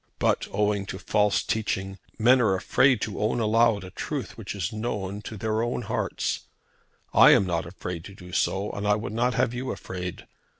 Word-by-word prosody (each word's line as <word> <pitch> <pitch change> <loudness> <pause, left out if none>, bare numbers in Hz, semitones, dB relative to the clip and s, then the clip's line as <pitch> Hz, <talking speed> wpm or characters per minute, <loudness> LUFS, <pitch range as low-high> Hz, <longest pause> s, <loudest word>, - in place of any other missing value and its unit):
But, - - +1
owing 105 -1 0
to 95 - -5
false 105 +1 +1
teaching, 95 -3 -2 0.2
men 125 +3 +5
are 100 -5 +3
afraid 125 +5 +3
to 105 - -3
own 110 +3 +1
aloud 115 -2 +3
a 95 - -9
truth - - -4
which - - -6
is 95 0 -3
known 105 -3 -3
to 110 0 -7
their 110 +2 -1
own 120 +1 -2
hearts. - - -2 0.7
I - - +8
am 100 - +4
not 85 -2 -1
afraid 90 -1 -6
to 100 - -10
do 90 -2 -12
so 95 +3 0
and 100 +1 -3
I 105 - +4
would 105 0 -4
not 120 +2 +1
have 115 - +1
you 130 +2 -3
afraid. 90 -1 -6
105 Hz, 195 wpm, -26 LUFS, 95-115 Hz, 0.7 s, I